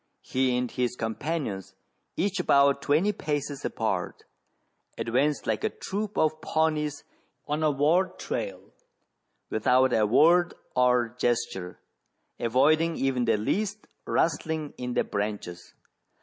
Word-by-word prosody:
He 130 -1 +1
and 125 -1 -2
his 125 -1 -1
companions, 110 - -3 0.4
each 195 0 0
about 140 -4 +4
twenty 160 +10 +2
paces 145 -6 -3
apart, - - -2 0.7
advanced 135 +5 0
like 110 -1 -1
a - - +2
troop 205 +1 -5
of 155 0 +1
Pawnies 155 -2 0 0.4
on 150 +1 -1
a 155 - +3
war 155 +6 +3
trail, - - -5 0.8
without 125 +4 +3
a 110 -1 +3
word 170 +9 +4 0.2
or 125 -2 +3
gesture, 115 -7 -2 0.6
avoiding 155 +8 +3
even 130 -2 0
the - - +3
least 200 - -2 0.2
rustling 160 -2 0
in 125 -1 -4
the - - +3
branches. 100 -4 -4
140 Hz, 120 wpm, -27 LUFS, 120-160 Hz, 0.8 s, about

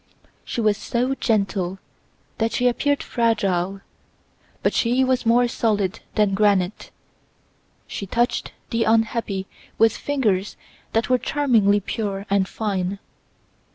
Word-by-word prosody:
She 235 - -3
was 210 -2 +2
so 250 +3 -1
gentle 195 -7 0 0.6
that 225 0 0
she 250 - +2
appeared 285 +4 +1
fragile; 195 -5 0 0.8
but - - +2
she 245 +3 +2
was 255 -2 +1
more 240 +1 +4
solid 210 -5 0 0.2
than 210 -2 +3
granite. 200 -1 +1 1.0
She 200 - -6
touched 240 +5 0 0.2
the 230 0 +1
unhappy 225 -3 +1 0.3
with 225 -1 +4
fingers 215 -9 -1 0.4
that 225 +3 +1
were 255 - +4
charmingly 225 -10 +2
pure 200 -1 -3
and 195 -1 +3
fine. 195 -3 -2
220 Hz, 120 wpm, -22 LUFS, 195-240 Hz, 1.0 s, more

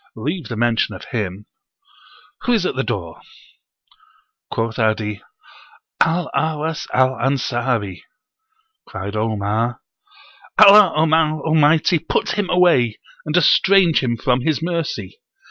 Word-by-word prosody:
Leave 150 +6 -4
the 115 - -6
mention 115 0 0
of - - -11
him. 105 -4 -4 1.0
Who 245 - +2
is 215 -5 +1
at - - -2
the 130 - 0
door?" 95 -11 -5 1.3
Quoth 115 +1 -3
'Adi, 110 -2 -1 0.8
"Al 165 +1 +1
Ahwas 160 0 -2
al 130 0 +3
Ansari." 120 -7 -2 0.9
Cried 100 +2 -7
Omar, 110 +2 -2 0.8
"Allah 200 -3 +7
Almighty 155 +1 +2
put 165 - -2
him 205 -3 -2
away, 170 -11 +3 0.3
and 155 +3 0
estrange 180 0 +4
him 120 -2 -1
from 125 +2 0
His 155 +2 0
mercy! 170 - -4
135 Hz, 110 wpm, -19 LUFS, 115-165 Hz, 1.3 s, Allah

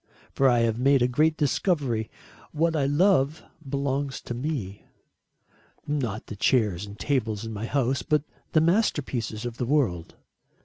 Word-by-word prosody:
For 135 -1 +4
I 120 -1 +3
have 115 0 +1
made 135 0 +4
a - - +4
great 155 +5 +2
discovery. 140 - 0 0.4
What 165 +2 +1
I 140 -3 +1
love 150 -1 +2 0.3
belongs 140 0 -1
to - - -6
me. 120 -7 -4 1.0
Not 125 -8 -2
the 105 - -8
chairs 105 -4 +1
and 100 +1 -10
tables 115 -6 -1
in 115 - -5
my 110 +2 -4
house, 135 -1 0
but 150 -3 +1 0.3
the 155 - +5
masterpieces 145 - 0
of 120 -1 -5
the 125 - -1
world. 115 - 0
130 Hz, 150 wpm, -26 LUFS, 115-150 Hz, 1.0 s, the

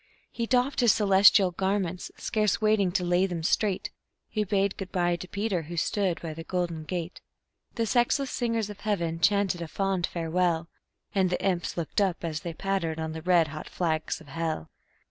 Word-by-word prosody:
He 230 -1 -3
doffed 255 +3 +2
his 240 -4 +6
celestial 195 -2 +5
garments, 190 -1 -1
scarce 210 -3 0
waiting 215 -4 +3
to 180 - +1
lay 175 +2 +2
them 170 -3 -4
straight; 195 +3 0 0.4
He 215 - -1
bade 200 -1 +1
good 190 -2 -7
by 175 -1 +1
to 185 - -8
Peter, 200 -2 -1
who 170 +2 -8
stood 185 +1 0
by 160 -2 -4
the 165 +1 -7
golden 170 -3 -2
gate; 175 0 -4 0.5
The 230 - 0
sexless 245 +4 +2
singers 230 -3 -1
of 200 - -11
heaven 170 -6 -1
chanted 195 0 +2
a 170 - -4
fond 190 +1 0
farewell, 170 0 0 0.4
And 190 -2 +2
the 180 - -1
imps 180 -3 -1
looked 170 +4 -1
up 190 -4 0
as 160 -2 -2
they 165 0 -6
pattered 190 -5 -1
on 160 0 -3
the 160 0 -6
red 170 -2 +3
hot 155 +1 -7
flags 160 -3 -1
of 160 - -15
hell. 160 - -3
180 Hz, 185 wpm, -27 LUFS, 165-200 Hz, 0.5 s, his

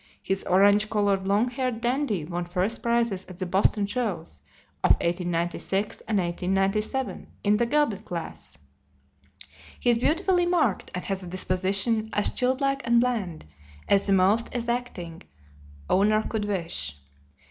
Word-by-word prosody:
His 195 0 -1
orange 205 +3 +4
colored, 200 -3 +1
long 210 +5 +2
haired 255 -2 -2
Dandy 240 - 0
won 175 +2 -3
first 185 +6 -1
prizes 235 -5 0
at 185 - -10
the 185 - -3
Boston 195 +3 +2
shows 200 - -3 0.4
of - - +6
1896 175 +3 -2
and 215 - +1
1897 195 +7 -1 0.2
in 210 0 +3
the 235 +1 +1
gelded 245 -7 +1
class. 165 - -7 1.2
He 245 - +3
is 230 - +2
beautifully 350 +6 +2
marked, 310 - +1
and 180 - -4
has 195 -1 -2
a 180 - -8
disposition 195 +5 0
as 210 - +1
"childlike 275 +2 0
and 235 0 +4
bland" 220 -10 -1 0.4
as 200 0 +3
the 200 - +3
most 195 +6 +2
exacting 235 -9 -3 0.7
owner 215 +3 +3
could 215 -2 -2
wish. 165 - -2
205 Hz, 135 wpm, -26 LUFS, 185-235 Hz, 1.2 s, of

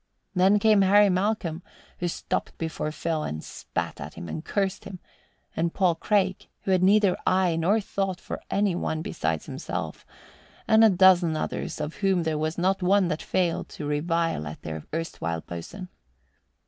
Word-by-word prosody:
Then 190 +2 +4
came 210 -1 +4
Harry 205 +2 +6
Malcolm, 185 -3 -1 0.4
who 175 - -1
stopped 170 - -3
before 160 -2 -3
Phil 160 +1 -2
and 80 - -4
spat - - -5
at - - -7
him 85 - -7
and 155 - -5
cursed 195 0 -1
him, 195 -2 -7 0.6
and 165 +1 -1
Paul 185 -3 +3
Craig, 190 +1 0
who 195 - -2
had 185 -1 +3
neither 200 0 +4
eye 185 -2 +3
nor 180 +7 +2
thought 195 -2 -2
for - - -6
any 200 -2 +1
one 160 -2 -2
besides 80 - -2
himself, - - -5 0.6
and 220 +1 +6
a 225 - +8
dozen 180 -4 +5
others - - -3
of 150 +1 -4
whom 190 -3 +2
there 160 -2 -1
was 155 +1 -2
not 190 +2 +1
one 190 0 +3
that 155 -1 -2
failed 175 -3 -1
to 150 - -7
revile 165 - 0
at 75 - -9
their 80 -1 -6
erstwhile 85 - -3
boatswain. 85 - -8
180 Hz, 170 wpm, -26 LUFS, 160-195 Hz, 0.6 s, a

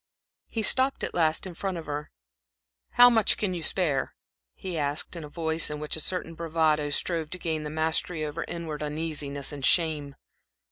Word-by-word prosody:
He 225 - -3
stopped 265 +5 +4
at - - -2
last 160 -1 +2
in 185 - -6
front 190 +1 -3
of 165 - -7
her. 145 0 -4 0.8
"How 245 - +9
much 225 -4 +4
can 200 -3 -1
you 175 - -4
spare?" 160 -5 0 0.4
he 185 -2 -6
asked, 145 +2 -1
in 170 - -6
a 150 - -8
voice 160 +1 0
in 150 0 -4
which 150 0 -3
a - - -5
certain 165 +1 -2
bravado 160 -2 +1
strove 160 +1 -1
to 185 - -3
gain 160 -3 -2
the 150 - -5
mastery 160 +1 0
over 150 +2 -4
inward 160 -3 -5
uneasiness 150 -2 -3
and 145 -2 -7
shame. 150 -3 +2
160 Hz, 185 wpm, -27 LUFS, 150-170 Hz, 0.8 s, How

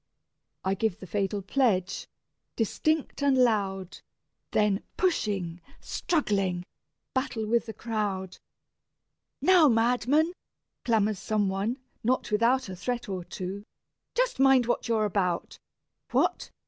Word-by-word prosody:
I 190 - +2
give 205 -1 0
the - - -8
fatal 195 +2 -1
pledge, 195 -5 +1 0.5
distinct 305 +8 0
and 280 -2 +3
loud, 195 -6 +1 0.5
Then 210 -1 +2 0.2
pushing, 195 - 0 0.2
struggling, 195 - 0 0.5
battle 250 -4 -1
with 235 +2 +1
the 220 - -5
crowd. 205 -5 -3 1.0
"Now, 360 -4 +7
madman!" 250 +7 +3 0.5
clamours 215 -4 +2
some 205 0 0
one, 200 +6 -1 0.3
not 245 0 0
without 235 +4 +3
A 190 - -6
threat 240 +6 -3
or 185 -2 -3
two, 185 +3 -6 0.5
"just - - +1
mind 270 -2 +6
what 240 - -1
you're 220 -2 +2
about: 185 -4 -1 0.5
What? - - +1
215 Hz, 115 wpm, -28 LUFS, 195-250 Hz, 1.0 s, Now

